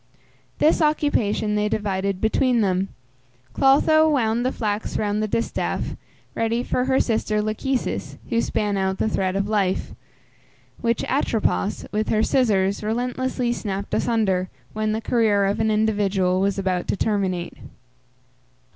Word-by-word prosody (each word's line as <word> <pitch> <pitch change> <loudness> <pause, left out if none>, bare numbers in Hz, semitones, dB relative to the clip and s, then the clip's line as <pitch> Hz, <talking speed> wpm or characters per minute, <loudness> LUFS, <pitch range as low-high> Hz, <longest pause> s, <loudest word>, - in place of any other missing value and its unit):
This 315 +2 +3
occupation 290 -9 +1
they 210 0 +1
divided 195 -2 -1
between 235 +3 +2
them. 190 -1 +1 0.7
Clotho 310 +4 +4
wound 235 -5 +1
the 255 - +1
flax 210 -3 -2
round 210 0 0
the 215 - 0
distaff, 230 - -2 0.4
ready 230 +1 0
for 250 - 0
her 265 0 +2
sister 220 -2 0
Lachesis, 215 +5 -2
who 230 -1 +2
span 205 -3 -1
out 190 0 0
the - - 0
thread 190 -3 -1
of 195 +1 0
life, 200 -3 0 0.9
which 230 -1 0
Atropos, 225 -6 0
with 215 +1 -1
her 220 0 +2
scissors, 200 -6 +2
relentlessly 245 +3 -1
snapt 200 -3 -4
asunder, 195 -6 +1 0.2
when 215 0 -1
the 220 +1 -2
career 220 -4 +2
of 200 +1 0
an 220 0 +2
individual 205 -4 +1
was 200 0 +1
about 185 -2 -1
to - - -1
terminate. 190 -5 -1
215 Hz, 140 wpm, -23 LUFS, 200-235 Hz, 0.9 s, Clotho